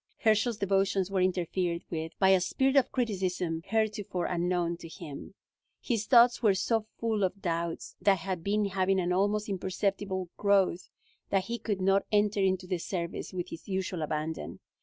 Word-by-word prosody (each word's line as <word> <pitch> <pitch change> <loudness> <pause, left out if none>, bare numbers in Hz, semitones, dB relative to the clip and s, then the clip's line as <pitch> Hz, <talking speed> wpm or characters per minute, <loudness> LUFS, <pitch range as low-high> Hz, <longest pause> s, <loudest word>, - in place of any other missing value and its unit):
Herschel's 220 +1 +2
devotions 195 -1 +1
were 190 -1 +1
interfered 180 -1 0
with 160 -1 -4
by 190 - +4
a 190 -1 +5
spirit 265 +8 +1
of 275 -3 +4
criticism 185 -8 -1
heretofore 210 -4 -1
unknown 175 -1 0
to 165 - -10
him. 165 +1 -9 0.4
His 225 -4 -2
thoughts 240 -1 +6
were 210 -5 +4
so 215 +3 0
full 220 -3 0
of 190 +1 -1
doubts 170 -2 -3
that 200 -1 +4
had 185 -1 -4
been 205 +2 +1
having 190 0 +1
an 180 0 0
almost 205 +3 +1
imperceptible 190 -1 -2
growth 195 -3 +2 0.4
that 195 -1 +2
he 235 +3 -4
could 205 -3 -2
not 195 +1 +2
enter 210 -1 +2
into 190 -1 +1
the 180 -1 -2
service 170 -1 -4
with 180 -2 -4
his 165 - -9
usual 190 -3 -2
abandon. 155 +1 -3
190 Hz, 165 wpm, -29 LUFS, 180-205 Hz, 0.4 s, thoughts